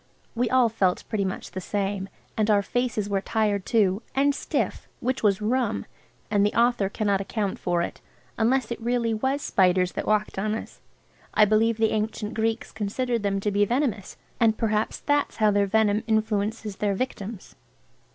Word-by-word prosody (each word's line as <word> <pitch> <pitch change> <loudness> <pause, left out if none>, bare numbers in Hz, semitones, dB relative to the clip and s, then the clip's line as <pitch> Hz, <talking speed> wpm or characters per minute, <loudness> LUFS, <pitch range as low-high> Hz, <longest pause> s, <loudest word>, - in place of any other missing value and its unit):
We 240 0 0
all 255 -2 +4
felt 195 -5 0
pretty 205 -3 0
much 190 - -5
the 185 - -5
same. 195 0 -2 0.3
And 215 0 +1
our 205 -1 +4
faces 240 -3 -1
were 200 -1 0
tired 205 -2 0
too, 205 -3 +2
and 280 +1 +3
stiff, - - -2
which 255 +2 -1
was 210 -1 +2
rum, 235 0 0 0.5
and 205 -1 +3
the 205 - +1
author 235 -5 +3
cannot 200 -1 0
account 200 -1 -2
for 175 -1 0
it, - - -6 0.3
unless 240 +1 +1
it 235 - -4
really 235 -1 0
was 265 +6 -1
spiders 180 -1 +3
that - - -4
walked 215 -2 +1
on 215 +2 0
us. - - -8 0.5
I 215 - +7
believe 220 +2 +2
the 220 -1 +2
ancient 215 0 -2
Greeks 225 +1 -1
considered 230 +3 -2
them 200 -1 0
to 210 - 0
be 205 +1 +3
venomous, 235 -3 -1 0.2
and 225 -2 +3
perhaps 215 -1 0
that's 290 0 0
how 215 -1 +3
their 200 0 +2
venom 210 0 +2
influences 215 -1 -1
their 205 -2 0
victims. 210 -3 -5
215 Hz, 175 wpm, -25 LUFS, 200-230 Hz, 0.5 s, I